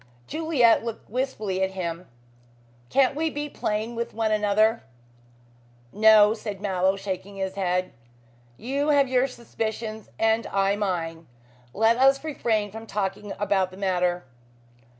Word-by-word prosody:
Juliet 295 Hz, -, +3 dB
looked 230 Hz, -3 st, -7 dB
wistfully 220 Hz, -7 st, -2 dB
at 190 Hz, -, +2 dB
him. 170 Hz, 0 st, -4 dB, 0.8 s
"Can't 270 Hz, -1 st, +3 dB
we 320 Hz, +2 st, 0 dB
be 295 Hz, 0 st, -4 dB
plain 220 Hz, -4 st, -3 dB
with 235 Hz, -1 st, -4 dB
one 220 Hz, -1 st, 0 dB
another?" 215 Hz, +2 st, +2 dB, 1.1 s
"No," 215 Hz, 0 st, +6 dB
said 210 Hz, -3 st, -6 dB
Mallow, 190 Hz, -1 st, +1 dB
shaking 195 Hz, 0 st, -5 dB
his 190 Hz, -1 st, -3 dB
head, 185 Hz, -1 st, -1 dB, 0.6 s
"you 280 Hz, +5 st, -1 dB
have 285 Hz, -2 st, +4 dB
your 255 Hz, +1 st, +2 dB
suspicions 220 Hz, -3 st, -5 dB
and 225 Hz, +1 st, +1 dB
I 195 Hz, 0 st, +1 dB
mine. 170 Hz, -5 st, -3 dB, 0.4 s
Let 225 Hz, -, +3 dB
us 270 Hz, +2 st, +4 dB
refrain 220 Hz, -9 st, -1 dB
from 225 Hz, +2 st, -9 dB
talking 200 Hz, 0 st, -3 dB
about 195 Hz, -2 st, +1 dB
the 185 Hz, -, -13 dB
matter." 180 Hz, -3 st, 0 dB
215 Hz, 130 wpm, -25 LUFS, 190-235 Hz, 1.1 s, No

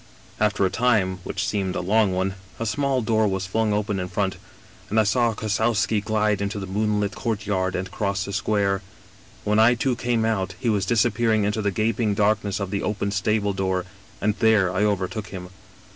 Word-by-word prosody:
" -, -, -25 dB
After 100 Hz, -1 st, 0 dB
a 95 Hz, -, 0 dB
time, 105 Hz, -6 st, +1 dB
which -, -, -3 dB
seemed 95 Hz, -3 st, -1 dB
a -, -, -1 dB
long 105 Hz, +2 st, +2 dB
one, 95 Hz, +1 st, -1 dB, 0.3 s
a 115 Hz, -, -2 dB
small 135 Hz, +2 st, 0 dB
door 110 Hz, -1 st, +2 dB
was 95 Hz, -1 st, -1 dB
flung 110 Hz, +3 st, 0 dB
open 105 Hz, -1 st, -1 dB
in 90 Hz, -, -3 dB
front, 95 Hz, 0 st, -1 dB, 0.5 s
and 110 Hz, -, +2 dB
I -, -, +5 dB
saw 115 Hz, +1 st, +2 dB
Kossowski 110 Hz, 0 st, +1 dB
glide 105 Hz, -1 st, +1 dB
into 100 Hz, +1 st, -2 dB
the 100 Hz, -, -4 dB
moonlit 105 Hz, +1 st, 0 dB
courtyard 100 Hz, -4 st, -1 dB
and 95 Hz, +1 st, -3 dB
cross 100 Hz, -2 st, -1 dB
the 100 Hz, -, -6 dB
square. 100 Hz, -1 st, +1 dB, 0.6 s
When 105 Hz, +1 st, +2 dB
I 115 Hz, +2 st, +6 dB
too 125 Hz, +1 st, 0 dB
came 120 Hz, -2 st, 0 dB
out 100 Hz, -5 st, -1 dB
he 125 Hz, -, 0 dB
was 100 Hz, -3 st, +1 dB
disappearing 115 Hz, -1 st, +2 dB
into 105 Hz, +2 st, 0 dB
the 100 Hz, -, +1 dB
gaping 110 Hz, +2 st, 0 dB
darkness 105 Hz, -1 st, +1 dB
of 100 Hz, -1 st, -4 dB
the 100 Hz, -, -1 dB
open 100 Hz, -1 st, -2 dB
stable 105 Hz, +1 st, 0 dB
door, 95 Hz, -1 st, -1 dB, 0.3 s
and 105 Hz, 0 st, +1 dB
there 110 Hz, -5 st, +4 dB
I 95 Hz, -, +1 dB
overtook 105 Hz, +1 st, -1 dB
him. 90 Hz, -2 st, -8 dB
105 Hz, 195 wpm, -24 LUFS, 95-110 Hz, 0.6 s, I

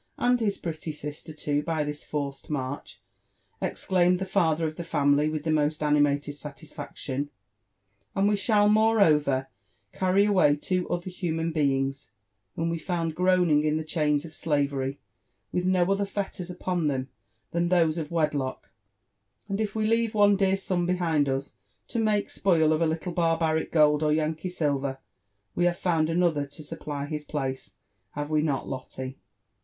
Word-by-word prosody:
and 245 Hz, 0 st, +3 dB
his 205 Hz, -3 st, 0 dB
pretty 160 Hz, -1 st, -5 dB
sister 150 Hz, +1 st, -7 dB
too, 145 Hz, -1 st, -1 dB
by 160 Hz, 0 st, -1 dB
this 150 Hz, 0 st, -5 dB
forced 140 Hz, -2 st, -4 dB
march," 140 Hz, -1 st, -4 dB, 0.6 s
exclaimed 180 Hz, -1 st, +2 dB
the 190 Hz, -, -3 dB
father 165 Hz, -4 st, +1 dB
of 155 Hz, -, -6 dB
the 170 Hz, -, -5 dB
family 145 Hz, -1 st, +2 dB
with 155 Hz, -1 st, -3 dB
the 160 Hz, -, 0 dB
most 155 Hz, 0 st, +1 dB
ani 150 Hz, 0 st, +3 dB
mated 145 Hz, 0 st, +1 dB
satisfaction; 145 Hz, -1 st, -6 dB, 0.4 s
*' 100 Hz, +1 st, -45 dB
and 195 Hz, +1 st, +3 dB
we 210 Hz, -, +3 dB
shall 205 Hz, 0 st, +3 dB
moreover, 195 Hz, -12 st, +4 dB, 0.5 s
carry 190 Hz, +2 st, +3 dB
away 180 Hz, -8 st, +4 dB
two 180 Hz, +4 st, -2 dB
other 175 Hz, +1 st, -2 dB
human 165 Hz, -2 st, -2 dB
beings, 135 Hz, -5 st, 0 dB, 0.5 s
whom 165 Hz, +1 st, -1 dB
we 165 Hz, -, -2 dB
found 165 Hz, -2 st, -2 dB
groaning 180 Hz, -3 st, +3 dB
in 155 Hz, 0 st, +1 dB
the 160 Hz, -, -2 dB
chains 150 Hz, -2 st, 0 dB
of 160 Hz, -, -10 dB
slavery, 140 Hz, -4 st, -1 dB, 0.5 s
with 180 Hz, 0 st, 0 dB
no 185 Hz, -1 st, +4 dB
other 195 Hz, +1 st, +2 dB
fetters 195 Hz, -3 st, -4 dB
upon 180 Hz, -2 st, -1 dB
them 130 Hz, -2 st, -1 dB, 0.4 s
than 170 Hz, 0 st, 0 dB
those 170 Hz, -2 st, +3 dB
of 150 Hz, -2 st, -4 dB
wedlock: 150 Hz, -5 st, -1 dB, 0.8 s
and 200 Hz, +1 st, -2 dB
if 210 Hz, -1 st, -2 dB
we 215 Hz, -1 st, 0 dB
leave 230 Hz, 0 st, +2 dB
one 205 Hz, -1 st, +5 dB
dear 195 Hz, -1 st, +2 dB
son 180 Hz, -2 st, -1 dB
behind 165 Hz, -6 st, +1 dB
us 135 Hz, +1 st, -2 dB, 0.3 s
to 235 Hz, -, -2 dB
make 215 Hz, -2 st, +1 dB
spoil 160 Hz, -5 st, +3 dB
of 155 Hz, -, 0 dB
a 165 Hz, -, +3 dB
little 160 Hz, +2 st, -2 dB
barbaric 165 Hz, -2 st, +1 dB
gold 150 Hz, -2 st, +4 dB
or 155 Hz, -1 st, +2 dB
Yankee 160 Hz, +3 st, 0 dB
silver, 140 Hz, -5 st, -1 dB, 0.6 s
we 175 Hz, -, +1 dB
have 175 Hz, 0 st, +2 dB
found 165 Hz, -4 st, +1 dB
another 165 Hz, -4 st, +1 dB
tosupply 145 Hz, 0 st, -6 dB
his 150 Hz, 0 st, -4 dB
place 135 Hz, -3 st, -4 dB, 0.2 s
— -, -, -47 dB
have 145 Hz, +1 st, -4 dB
we 155 Hz, -1 st, +3 dB
not 145 Hz, -3 st, -1 dB
Lotte? 130 Hz, 0 st, -6 dB
160 Hz, 170 wpm, -27 LUFS, 145-180 Hz, 0.8 s, one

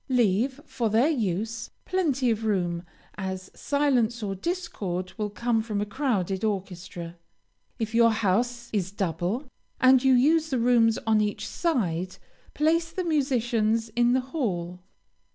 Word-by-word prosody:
Leave, 245 Hz, +2 st, +2 dB
for 250 Hz, -4 st, -1 dB
their 230 Hz, +8 st, +3 dB
use, 225 Hz, -, -2 dB, 0.2 s
plenty 280 Hz, -10 st, +1 dB
of 225 Hz, 0 st, -2 dB
room, 175 Hz, -5 st, 0 dB, 0.4 s
as 190 Hz, -1 st, -5 dB
silence 250 Hz, -6 st, +1 dB
or 195 Hz, -1 st, -2 dB
discord 195 Hz, -, -3 dB
will 210 Hz, -2 st, -2 dB
come 230 Hz, +2 st, 0 dB
from 215 Hz, -2 st, -3 dB
a 205 Hz, -, 0 dB
crowded 205 Hz, -6 st, -1 dB
orchestra. 180 Hz, -4 st, -4 dB, 0.6 s
If 225 Hz, -2 st, -3 dB
your 230 Hz, 0 st, +6 dB
house 230 Hz, +3 st, 0 dB
is 190 Hz, -3 st, -1 dB
double, 190 Hz, -, -2 dB, 0.4 s
and 260 Hz, 0 st, +6 dB
you 265 Hz, -1 st, +5 dB
use 315 Hz, +5 st, +3 dB
the 265 Hz, -, 0 dB
rooms 230 Hz, -2 st, +4 dB
on 220 Hz, -1 st, +3 dB
each 210 Hz, -1 st, -2 dB
side, 185 Hz, -, -1 dB, 0.4 s
place 330 Hz, +2 st, +2 dB
the 370 Hz, -, -3 dB
musicians 240 Hz, -8 st, +1 dB
in 240 Hz, +2 st, +2 dB
the 260 Hz, -, +3 dB
hall. 180 Hz, -, -2 dB
225 Hz, 140 wpm, -26 LUFS, 195-260 Hz, 0.6 s, your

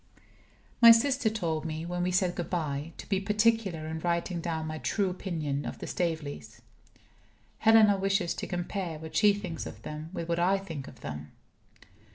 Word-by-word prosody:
My 235 Hz, -, +11 dB
sister 245 Hz, +1 st, +5 dB
told 170 Hz, -8 st, -2 dB
me 160 Hz, 0 st, -4 dB
(when 175 Hz, +1 st, -3 dB
we 180 Hz, -, +1 dB
said 180 Hz, -1 st, +2 dB
good 175 Hz, -2 st, -4 dB
by) 155 Hz, -3 st, -2 dB
to -, -, -9 dB
be 195 Hz, -2 st, +1 dB
particular 210 Hz, -4 st, +1 dB
in 160 Hz, 0 st, -4 dB
writing 170 Hz, +1 st, -1 dB
down 160 Hz, -2 st, -2 dB
my 155 Hz, 0 st, -4 dB
true 195 Hz, +1 st, 0 dB
opinion 155 Hz, -6 st, -3 dB
of -, -, -5 dB
the -, -, -7 dB
Staveleys. 160 Hz, -5 st, -3 dB, 1.0 s
Helena 220 Hz, -2 st, +6 dB
wishes 195 Hz, -2 st, +1 dB
to -, -, -5 dB
compare 175 Hz, -2 st, -3 dB
what 160 Hz, +1 st, -9 dB
she 210 Hz, -1 st, +6 dB
thinks 185 Hz, -5 st, -4 dB
of 110 Hz, -, -10 dB
them 155 Hz, +1 st, -6 dB
with 170 Hz, -3 st, -5 dB
what 170 Hz, 0 st, 0 dB
I 185 Hz, +3 st, +3 dB
think 165 Hz, -8 st, -7 dB
of 125 Hz, -, -13 dB
them. 75 Hz, 0 st, -7 dB
175 Hz, 180 wpm, -29 LUFS, 160-195 Hz, 1.0 s, My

